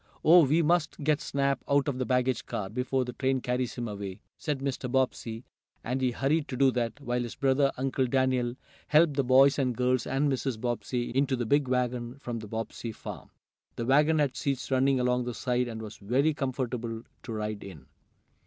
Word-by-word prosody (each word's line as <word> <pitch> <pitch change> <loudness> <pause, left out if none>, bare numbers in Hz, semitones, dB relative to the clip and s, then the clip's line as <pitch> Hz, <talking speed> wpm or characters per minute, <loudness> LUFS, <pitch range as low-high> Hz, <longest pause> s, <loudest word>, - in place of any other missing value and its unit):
"Oh, 170 +2 +8
we 160 +5 +3
must 160 -2 +1
get 150 0 +2
Snap 140 -1 0
out 140 0 +3
of 135 -3 -2
the 130 - -1
baggage 125 -2 +1
car, 95 -1 -4
before 125 +2 -1
the 125 - -6
train 130 +1 0
carries 125 0 -2
him 120 -1 -3
away," 100 -2 -6 0.2
said 150 -3 -2
Mr. 130 -2 -3
Bobbsey, 125 -3 -1 0.4
and 125 +3 -2
he 130 - +3
hurried 140 +5 0
to 130 - -5
do 135 0 +5
that, 120 +2 -2
while 125 -3 -1
his 120 -1 -5
brother, 135 0 +2
Uncle 130 0 0
Daniel, 130 -1 +1 0.3
helped 155 0 +5
the 140 0 +1
boys 135 +3 +5
and 125 -3 0
girls 125 0 +1
and 135 +3 +1
Mrs. 130 -3 -2
Bobbsey 120 +1 -2
into 135 0 +2
the 120 -1 -2
big 140 +4 +2
wagon 125 0 -1
from 120 -4 -5
the 110 - -8
Bobbsey 115 +1 -5
farm. - - -9 0.5
The 115 - -3
wagon 150 +5 +4
had 145 -4 +1
seats 135 -1 -2
running 135 0 +3
along 125 0 +1
the 120 -1 -4
side 125 -1 0
and 110 -1 -6
was 105 -1 -8
very 130 +9 +1
comfortable 120 -4 -3 0.2
to 120 - -8
ride 105 -1 -3
in. 80 -9 -11
130 Hz, 200 wpm, -28 LUFS, 120-140 Hz, 0.5 s, Oh